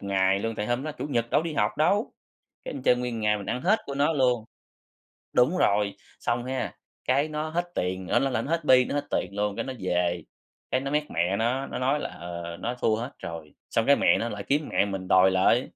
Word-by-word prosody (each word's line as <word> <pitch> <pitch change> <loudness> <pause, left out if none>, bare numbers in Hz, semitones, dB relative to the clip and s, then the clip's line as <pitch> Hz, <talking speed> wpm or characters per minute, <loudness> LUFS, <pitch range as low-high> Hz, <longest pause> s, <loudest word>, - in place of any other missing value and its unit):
ngày 95 -1 +2
luôn, 115 +2 -2
tại 105 - -3
hôm 120 +3 0
đó 155 +1 -4
Chủ 150 - -5
nhật 120 -5 -1
đâu - - +3
đi 165 - -3
học 150 - 0
đâu, 200 +8 +2 0.5
cái - - -5
mình 135 - -6
chơi 125 - +4
nguyên 125 -1 -3
một 115 - -4
ngày 105 0 +3
mình 100 - -8
ăn 125 - -2
hết 215 +5 +4
của 140 - -4
nó 145 +3 +2
luôn. 125 -5 +2 0.9
Đúng 130 +9 +3
rồi, 100 - +2 0.2
xong 120 0 -1
ha, 130 0 -3 0.3
cái 140 +4 +2
nó 155 +1 -3
hết 175 +2 -1
tiền 90 0 -2
ơ, - - +3
nó 135 - +1
là 115 -3 0
nó - - -5
hết 165 -1 0
bi 130 -3 +6
nó - - -4
hết 145 0 -1
tiền 90 - -1
luôn, 105 0 -1
cái - - -2
nó 130 - -4
về, 90 -2 0 0.5
cái 130 - +1
nó 135 +1 -3
méc 150 0 0
mẹ 90 +4 +1
nó, 125 +5 0
nó - - -5
nói 135 +3 +1
là, - - -3
ờ, 85 -1 -7
nó 120 - -2
thua 110 - +2
hết 120 +4 -4
rồi, 80 -2 -8 0.2
xong 115 - +1
cái 140 - +6
mẹ - - +4
nó 115 - -1
lại 105 -3 -5
kiếm 145 +5 0
mẹ - - +3
mình 95 -2 -5
đòi 95 0 +6
lại. 95 +6 +4
120 Hz, 255 wpm, -27 LUFS, 100-140 Hz, 0.9 s, bi